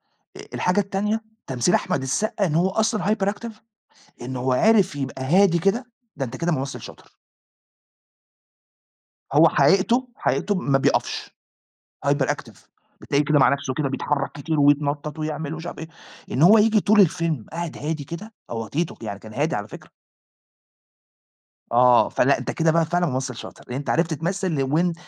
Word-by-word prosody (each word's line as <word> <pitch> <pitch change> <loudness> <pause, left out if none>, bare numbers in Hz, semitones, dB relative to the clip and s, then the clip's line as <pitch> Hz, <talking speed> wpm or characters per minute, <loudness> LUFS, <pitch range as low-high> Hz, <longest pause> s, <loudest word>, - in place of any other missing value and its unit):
أ - - -19
الحاجة 180 +3 +1
التانية 205 +3 -1 0.2
تمثيل 130 +6 +1
أحمد 180 -6 -1
السقا 205 - -1
إن 155 -3 -1
هو 180 +3 +3
أصلًا 215 +1 0
hyperactive، 210 +2 -1 0.7
إن 130 +1 -5
هو 130 +1 0
عرف 200 - +3
يبقى 135 -1 -4
هادي 175 +4 +4
كده، 195 +9 +1 0.3
ده 135 - -2
أنت 120 - -7
كده 170 +1 -1
ممثل 135 -2 -3
شاطر. - - -13 2.2
هو 155 +3 +6
حقيقته 195 - +3
حقيقته 205 - 0
ما 140 -7 +1
بيقفش، - - -1 0.8
hyperactive - - -1 0.4
بتلاقيه 145 +1 0
كده 150 0 +3
مع 135 - +5
نفسه 140 -1 -1
كده 145 0 -1
بيتحرك 140 +1 -2
كتير 145 +1 -2
ويتنطط 145 +1 +1
ويعمل 155 0 -4
ومش 165 +2 -8
عارف - - -7
إيه. 160 - -7 0.4
إن 130 - 0
هو 210 +6 +8
ييجي 215 0 +4
طول 210 +1 +4
الفيلم 165 - +1
قاعد 170 -1 -5
هادي 150 0 -3
كده، 170 +9 -8 0.2
هو 115 -1 -4
تيتو، 165 +7 -2
يعني 100 -2 -5
كان 110 +1 -12
هادي 150 -1 0
على 105 +1 -5
فكرة. - - -12 1.8
آه، 125 0 +5
فلأ 140 +3 +2
أنت - - -4
كده 160 -1 +2
بقى 165 0 +2
فعلًا 175 +2 0
ممثل 130 -2 -3
شاطر، - - -10
لإن 125 - -4
أنت 145 - -5
عرفت 165 0 +1
تمثل 170 -2 -1
وإن 165 +6 +1
160 Hz, 160 wpm, -23 LUFS, 140-190 Hz, 2.2 s, هو